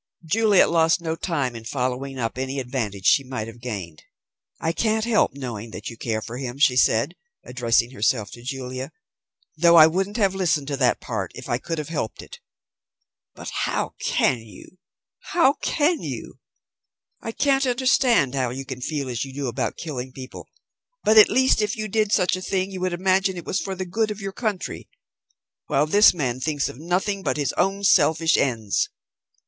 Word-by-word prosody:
Juliet 210 +2 +4
lost 165 0 +3
no 165 -1 -3
time 145 -8 -2
in 115 - -8
following 130 +2 -3
up 115 -2 -2
any 135 +1 -3
advantage 115 -7 -4
she 140 - +5
might 130 -4 -5
have 115 +1 -11
gained. 95 -10 -6 0.6
"I 165 - 0
can't 220 +4 0
help 225 -10 +2
knowing 120 -5 -6
that 110 - -7
you - - -10
care 110 -1 -3
for 120 +2 -7
him," 130 -1 -5
she 140 -3 +4
said, 125 +4 +3 0.3
addressing 120 -1 +1
herself 110 -2 0
to 120 - -11
Julia, 130 0 -5 0.6
"though 170 +2 +5
I 160 -2 +10
wouldn't 190 +6 -1
have 200 -4 +2
listened 170 -7 0
to 140 - -2
that - - +2
part - - -4
if - - -9
I 120 - -1
could 165 +4 -4
have 150 -1 -5
helped 145 -9 -4
it. - - -12 1.0
But - - -7
how - - -2
can 125 - +1
you? 110 - -15 0.6
How 305 -6 +5
can 320 +2 +1
you? - - -7 0.8
I 225 - -4
can't 275 +2 +1
understand 250 - +3
how 130 -3 0
you 135 +3 -6
can 130 -2 -7
feel 145 0 -3
as 120 -3 -2
you 135 - -7
do 140 +1 -4
about 120 - -2
killing 130 -5 -5
people, 130 0 -10 0.6
but 215 - +4
at 215 - +8
least 260 -3 +3
if 210 -1 -1
you 215 0 -3
did 215 0 0
such 185 -4 +3
a 185 - -6
thing 190 +1 -1
you 185 -1 -6
would 185 -1 -1
imagine 190 +1 +1
it 175 - -7
was 190 - -1
for 195 -1 -4
the 185 0 -4
good 220 +5 -1
of 210 -1 -5
your 195 -1 -5
country, 215 -5 -4 0.8
while 140 +2 +2
this 205 +7 +6
man 130 -7 -2
thinks 145 +1 -1
of 125 - -9
nothing 185 +5 -1
but 190 - -1
his 145 -4 -1
own 195 +1 0
selfish 160 -3 +4
ends. 115 -6 0
150 Hz, 190 wpm, -23 LUFS, 125-195 Hz, 1.0 s, I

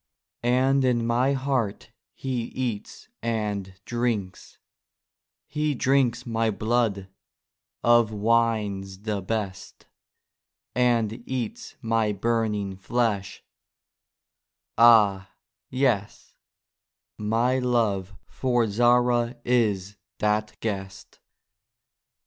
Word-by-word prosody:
And 130 +3 +3
in 120 -2 +2
my 125 +4 +2
heart 130 -6 -2 0.2
he 125 -3 -3
eats 120 -6 -5
and 105 -4 -3
drinks; 120 -6 -3 0.9
He 150 -1 -1
drinks 130 -2 +1
my 115 -1 0
blood, 110 -2 0 0.8
of 120 -2 +4
wines 105 -3 0
the 105 -2 -2
best, 100 -1 -5 0.9
And 120 -2 +1
eats 125 -4 -4
my 110 -2 +1
burning 105 -2 -1
flesh—ah, 105 0 0 0.4
yes, 125 -6 -1 0.9
My 115 +5 +1
love 105 -6 0
for 120 -3 0
Zahra 120 +2 +2
is 105 -5 +1 0.2
that 105 0 -1
Guest. 100 -3 -5
115 Hz, 80 wpm, -25 LUFS, 105-120 Hz, 0.9 s, of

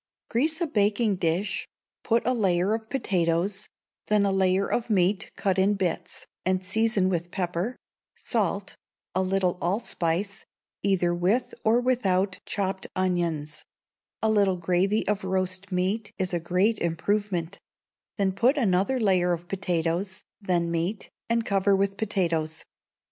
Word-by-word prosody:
Grease 305 +7 +1
a - - +3
baking 210 -4 +2
dish; 175 +3 -1 0.4
put 230 0 +1
a 255 - +3
layer 190 -3 +2
of 220 0 -4
potatoes, 190 -3 0 0.4
then 210 -1 +3
a 200 - +2
layer 190 0 +2
of 235 -1 -1
meat 195 -1 +2
cut 190 -1 0
in 200 +2 +3
bits, 185 -4 -2 0.2
and 185 0 0
seasoned 205 -1 +2
with 175 -1 -2
pepper, 180 +6 -2 0.4
salt, 200 -4 -1 0.4
a 190 - +2
little 185 -1 +1
allspice, 190 0 -1 0.4
either 180 -3 +2
with 185 +8 +1
or 225 +2 +4
withouf 200 -7 +1
chopped 190 -1 -2
onions; 170 -5 -1 0.6
a 220 - +4
little 200 -3 +3
gravy 185 +5 +1
of 205 -2 0
roast 185 +1 -1
meat 195 +4 -1
is 185 -2 -1
a 175 - +1
great 185 +6 +1
improvement: 185 +1 -1 0.6
then 195 -2 +2
put 245 +9 +2
another 210 +2 +2
layer 185 -5 +3
of 170 +1 -5
potatoes, 180 +1 -1 0.2
then 175 -3 0
meat, 170 +5 -2 0.2
and 230 0 +1
cover 200 0 +3
with 195 0 +1
potatoes. 170 -7 -1
190 Hz, 140 wpm, -26 LUFS, 180-210 Hz, 0.6 s, or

